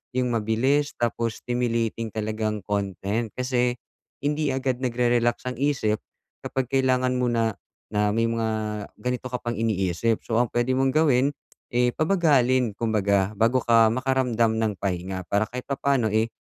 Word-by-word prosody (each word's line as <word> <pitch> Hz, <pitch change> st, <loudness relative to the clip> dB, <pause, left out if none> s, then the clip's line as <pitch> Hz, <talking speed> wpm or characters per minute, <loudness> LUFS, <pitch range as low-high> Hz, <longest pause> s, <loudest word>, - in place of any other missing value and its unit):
yung 125 Hz, -1 st, +1 dB
mabilis 125 Hz, +7 st, +1 dB
tapos 115 Hz, -1 st, -1 dB
stimulating 115 Hz, -2 st, -1 dB
talagang 110 Hz, 0 st, -2 dB
content 100 Hz, +2 st, -2 dB
kasi 125 Hz, -1 st, 0 dB, 0.4 s
hindi 150 Hz, 0 st, 0 dB
agad 130 Hz, -1 st, -1 dB
nagre-relax 120 Hz, 0 st, +1 dB
ang 125 Hz, -, -3 dB
isip 135 Hz, -7 st, +1 dB, 0.4 s
kapag 130 Hz, -2 st, -2 dB
kailangan 130 Hz, -1 st, +2 dB
mo 125 Hz, -, +1 dB
na, 115 Hz, -3 st, +1 dB, 0.4 s
na 105 Hz, 0 st, +2 dB
may 115 Hz, +2 st, +1 dB
mga 115 Hz, -1 st, -1 dB, 0.5 s
ganito 125 Hz, +2 st, -3 dB
ka 125 Hz, -, -2 dB
pang 120 Hz, 0 st, -3 dB
iniisip. 110 Hz, 0 st, 0 dB
So 115 Hz, -, -1 dB
ang 120 Hz, -, -1 dB
puwede 120 Hz, +2 st, +1 dB
mong 135 Hz, 0 st, +2 dB
gawin, 140 Hz, -3 st, +4 dB, 0.4 s
eh, 125 Hz, 0 st, +2 dB
pabagalin 135 Hz, -, +3 dB
kumbaga 100 Hz, -3 st, +1 dB
bago 115 Hz, +3 st, +3 dB
ka 115 Hz, -1 st, +5 dB
makaramdam 125 Hz, -3 st, +1 dB
ng 110 Hz, -2 st, +1 dB
pahinga 95 Hz, -1 st, -3 dB
para 100 Hz, +1 st, +2 dB
kahit 125 Hz, 0 st, -5 dB
papaano, 135 Hz, -5 st, +1 dB
eh, 110 Hz, +1 st, +2 dB
120 Hz, 145 wpm, -25 LUFS, 110-130 Hz, 0.5 s, ka